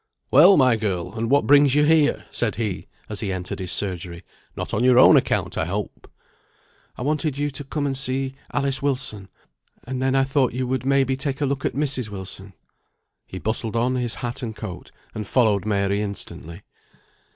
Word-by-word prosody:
"Well, 175 Hz, +8 st, +7 dB
my 130 Hz, -4 st, +4 dB
girl! 95 Hz, -4 st, -3 dB
and 115 Hz, 0 st, -3 dB
what 140 Hz, +2 st, +3 dB
brings 145 Hz, -1 st, +5 dB
you 150 Hz, 0 st, +4 dB
here?" 155 Hz, -1 st, +3 dB
said 115 Hz, -3 st, -1 dB
he, 110 Hz, -5 st, -3 dB, 0.2 s
as 105 Hz, -, -6 dB
he 100 Hz, -3 st, -3 dB
entered 90 Hz, -1 st, -5 dB
his 90 Hz, -2 st, -3 dB
surgery. 90 Hz, -3 st, -2 dB, 0.3 s
"Not -, -, -5 dB
on 110 Hz, -, +1 dB
your 125 Hz, -1 st, +5 dB
own 130 Hz, -, +8 dB
account, -, -, +1 dB
I -, -, 0 dB
hope." 100 Hz, +4 st, -5 dB, 0.9 s
"I -, -, -5 dB
wanted 150 Hz, 0 st, -1 dB
you 145 Hz, 0 st, -1 dB
to 140 Hz, +1 st, -6 dB
come 145 Hz, +1 st, -3 dB
and 135 Hz, -1 st, -1 dB
see 135 Hz, 0 st, -1 dB, 0.2 s
Alice 140 Hz, -2 st, 0 dB
Wilson, 125 Hz, -8 st, -3 dB, 0.5 s
and 130 Hz, 0 st, -5 dB
then 130 Hz, 0 st, +1 dB
I 135 Hz, -, +4 dB
thought 135 Hz, -2 st, +1 dB
you 130 Hz, +1 st, -2 dB
would 130 Hz, +1 st, -2 dB
may 135 Hz, 0 st, +4 dB
be 130 Hz, 0 st, -1 dB
take 135 Hz, 0 st, -3 dB
a 145 Hz, -, +1 dB
look 135 Hz, -1 st, -2 dB
at -, -, -1 dB
Mrs. 135 Hz, -5 st, -1 dB
Wilson." 95 Hz, 0 st, -9 dB, 0.7 s
He 95 Hz, -, -8 dB
bustled 110 Hz, +3 st, -2 dB
on 120 Hz, +2 st, +1 dB
his 125 Hz, -3 st, -2 dB
hat 120 Hz, +3 st, -4 dB
and 115 Hz, -3 st, -5 dB
coat, 100 Hz, -6 st, -8 dB, 0.2 s
and 105 Hz, -2 st, -5 dB
followed 105 Hz, -6 st, +2 dB
Mary 100 Hz, -1 st, 0 dB
instantly. 100 Hz, -3 st, -6 dB
125 Hz, 195 wpm, -23 LUFS, 100-135 Hz, 0.9 s, own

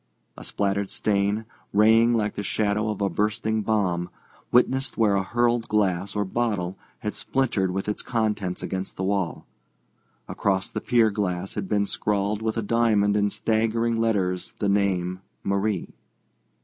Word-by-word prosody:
A -, -, -10 dB
splattered 100 Hz, -1 st, -1 dB
stain, 105 Hz, +1 st, 0 dB, 0.3 s
raying 115 Hz, +3 st, +5 dB
like 105 Hz, -2 st, 0 dB
the -, -, -4 dB
shadow 105 Hz, +1 st, 0 dB
of 105 Hz, -1 st, -3 dB
a 100 Hz, -, +3 dB
bursting 110 Hz, +1 st, 0 dB
bomb, 95 Hz, -5 st, 0 dB, 0.4 s
witnessed 130 Hz, +2 st, +2 dB
where 110 Hz, -3 st, +3 dB
a 100 Hz, -, +2 dB
hurled 120 Hz, +3 st, +1 dB
glass 100 Hz, -2 st, 0 dB
or 105 Hz, 0 st, 0 dB
bottle 95 Hz, -4 st, -1 dB, 0.3 s
had 105 Hz, -, -2 dB
splintered 120 Hz, -8 st, 0 dB
with 95 Hz, +2 st, -3 dB
its 105 Hz, -, -1 dB
contents 105 Hz, -6 st, -1 dB
against 95 Hz, 0 st, -4 dB
the 95 Hz, -, -2 dB
wall. 95 Hz, -3 st, -1 dB, 0.8 s
Across 95 Hz, -1 st, 0 dB
the -, -, -3 dB
pier 115 Hz, -3 st, +3 dB
glass 95 Hz, -2 st, -2 dB
had 100 Hz, -2 st, -4 dB
been 105 Hz, -1 st, +2 dB
scrawled 105 Hz, +1 st, -1 dB
with 110 Hz, 0 st, -1 dB
a 115 Hz, -, 0 dB
diamond 105 Hz, -2 st, +2 dB
in 105 Hz, -1 st, +2 dB
staggering 115 Hz, +2 st, 0 dB
letters 95 Hz, -5 st, 0 dB
the 105 Hz, -, -1 dB
name 95 Hz, -2 st, +1 dB, 0.2 s
"Marie." 100 Hz, +1 st, -1 dB
105 Hz, 150 wpm, -25 LUFS, 100-110 Hz, 0.8 s, raying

